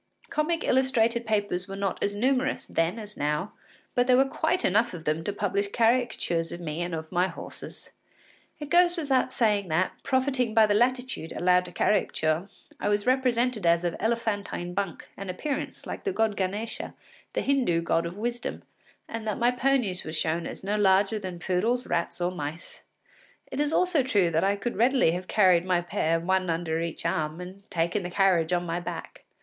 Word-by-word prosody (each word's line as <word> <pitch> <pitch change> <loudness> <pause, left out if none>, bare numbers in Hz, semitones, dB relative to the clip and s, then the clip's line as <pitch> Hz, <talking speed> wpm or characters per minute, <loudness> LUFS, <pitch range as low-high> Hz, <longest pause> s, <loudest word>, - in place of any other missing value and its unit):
Comic 320 +2 0
illustrated 240 -3 +2
papers 205 -4 0
were 195 - -6
not 195 -1 -2
as 205 - 0
numerous 255 +4 +1
then 165 +6 0
as 210 -2 -8
now, 150 +6 -1 0.4
but 245 0 +2
there 250 -1 +5
were 270 - +5
quite 320 +6 0
enough 210 +2 +2
of 160 - -9
them 155 +2 0
to 205 - -1
publish 200 0 -1
caricatures 225 -7 +1
of 170 - -6
me 165 -1 -4
and 175 -1 -2
of 160 0 -7
my 180 0 +2
horses. - - -9 0.7
It 295 -1 -7
goes 350 0 +5
without 270 -5 +1
saying 210 -6 +1
that, 175 +3 +1
profiting 260 -3 0
by 220 -1 +7
the 210 - +2
latitude 245 -6 0
allowed 180 0 +3
to 175 - -9
caricature, 175 -2 +1 0.3
I - - 0
was 205 0 +1
represented 250 -5 +1
as 170 +1 +4
of 175 -1 -1
elephantine 205 -5 -2
bulk 195 -3 -3
and 195 -1 -7
appearance, 275 +10 -4
like - - -6
the 405 - 0
god 225 - +1
Ganesa, 205 +4 -3 0.4
the - - -1
Hindoo 250 -12 +2
god 170 0 +1
of 175 +3 -8
wisdom, 240 +2 -3 0.4
and 225 -1 -5
that 215 - -1
my 240 +1 +3
ponies 250 -7 +1
were 155 - -6
shown 160 +1 -1
as - - -8
no 205 +2 0
larger 195 +1 +3
than 185 -3 -6
poodles, 210 +8 0
rats, 170 - -2
or 175 +1 0
mice. 155 -1 -7 0.7
It 265 - -4
is 295 0 +1
also 360 -3 +4
true 205 -9 +2
that 160 0 +1
I 200 +1 +2
could 205 +3 -4
readily 250 -3 +4
enough 165 - 0
have 185 +1 -8
carried 185 -5 +4
my 180 -1 +2
pair 165 -1 0
one 185 +1 0
under 165 -1 -1
each 165 -1 -4
arm, 160 -2 -1
and 190 +3 -10
taken 170 +4 0
the 175 - -5
carriage 180 -3 +2
on 175 0 +1
my 170 +1 -2
back. 175 - -7
200 Hz, 190 wpm, -27 LUFS, 175-240 Hz, 0.7 s, by